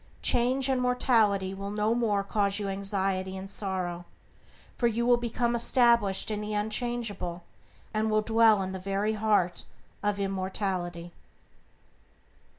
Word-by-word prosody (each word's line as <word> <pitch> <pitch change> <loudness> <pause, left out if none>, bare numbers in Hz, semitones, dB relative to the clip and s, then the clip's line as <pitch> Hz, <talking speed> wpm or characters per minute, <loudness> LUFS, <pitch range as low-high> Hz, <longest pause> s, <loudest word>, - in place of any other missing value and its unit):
Change 255 +2 +2
and 260 -2 +1
mortality 220 -6 +2
will 195 +1 -6
no 210 +2 0
more 215 -4 +1
cause 200 0 0
you 205 -1 -2
anxiety 195 -1 -2
and 195 +1 -8
sorrow, 180 -4 -3 0.7
for 240 - +2
you 235 +1 0
will 245 0 +5
become 240 0 -1
established 235 -4 +3
in 210 0 -2
the 210 0 -4
unchangeable, 210 -5 -2 0.5
and 215 0 0
will 215 0 +2
dwell 220 -2 +4
in 190 - -4
the 190 - -5
very 200 +3 -1
heart 210 -4 +1 0.4
of 205 -1 -1
immortality. 185 -3 -3
205 Hz, 135 wpm, -28 LUFS, 195-230 Hz, 0.7 s, will